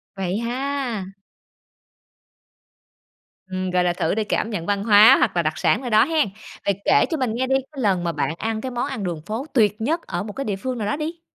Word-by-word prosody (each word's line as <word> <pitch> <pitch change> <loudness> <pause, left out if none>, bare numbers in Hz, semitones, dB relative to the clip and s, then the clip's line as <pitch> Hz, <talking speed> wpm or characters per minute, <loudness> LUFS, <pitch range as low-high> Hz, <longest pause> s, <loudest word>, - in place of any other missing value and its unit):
Vậy 190 +2 -2
ha! 250 -2 -2 2.5
Ừm, 185 0 -3
gọi 180 0 +2
là, 175 -1 +1
thử 165 +1 -1
để 220 - 0
cảm 215 +1 -1
nhận 180 -7 -4
văn 200 0 0
hóa 210 0 +8
hoặc - - +1
là 170 - +3
đặc 155 +1 -1
sản - - +2
ở 250 - -4
đó 215 -1 +5
hen? 315 -5 +1 0.4
Vậy 200 -1 0
kể - - +5
cho 320 - -1
mình 255 -4 -1
nghe 255 +2 -1
đi, 265 - +2 0.2
cái 280 -3 -6
lần 190 -5 +1
mà 170 - 0
bạn 160 0 -1
ăn 220 +1 -2
cái 260 - -4
món 240 +1 -2
ăn 260 -8 -4
đường 170 -4 -3
phố 225 +6 -4
tuyệt 215 -3 +2
nhất 320 +9 0
ở 175 +2 -3
một 210 0 -7
cái 275 - -4
địa 205 - -1
phương 250 +6 -4
nào 210 -3 -2
đó 210 - 0
đi. 320 +3 -5
215 Hz, 235 wpm, -22 LUFS, 190-260 Hz, 2.5 s, hóa